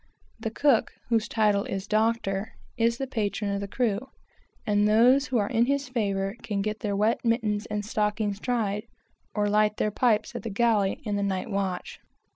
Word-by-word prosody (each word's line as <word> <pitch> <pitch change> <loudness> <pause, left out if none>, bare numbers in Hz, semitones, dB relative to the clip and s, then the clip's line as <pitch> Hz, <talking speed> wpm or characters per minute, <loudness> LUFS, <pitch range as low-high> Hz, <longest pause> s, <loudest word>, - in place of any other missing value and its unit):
The 225 - -2
cook 265 +1 +2 0.2
is 225 -1 +2
the 220 +2 0
patron 210 -4 -2
of 200 - -2
the 200 - -4
crew, 210 -1 0 0.7
and 205 -1 +3
those 245 +6 +5
who 255 - 0
are 205 -2 +1
in 235 +2 +2
his 280 -1 0
favor 200 -4 -1
can 200 -2 -2
get 215 +1 -3
their 205 -2 -2
wet 215 +3 +1
mittens 220 -3 0
and 210 -1 -3
stockings 210 -1 -1
dried, 215 -3 -1 0.5
or 210 -1 +1
light 210 0 +2
their 215 - 0
pipes 220 -1 +1
at - - -5
the 230 - -5
galley 210 -2 +2
on 205 -2 -1
the - - -1
night 195 +2 -2
watch. 195 -2 -3
210 Hz, 165 wpm, -27 LUFS, 200-230 Hz, 0.7 s, those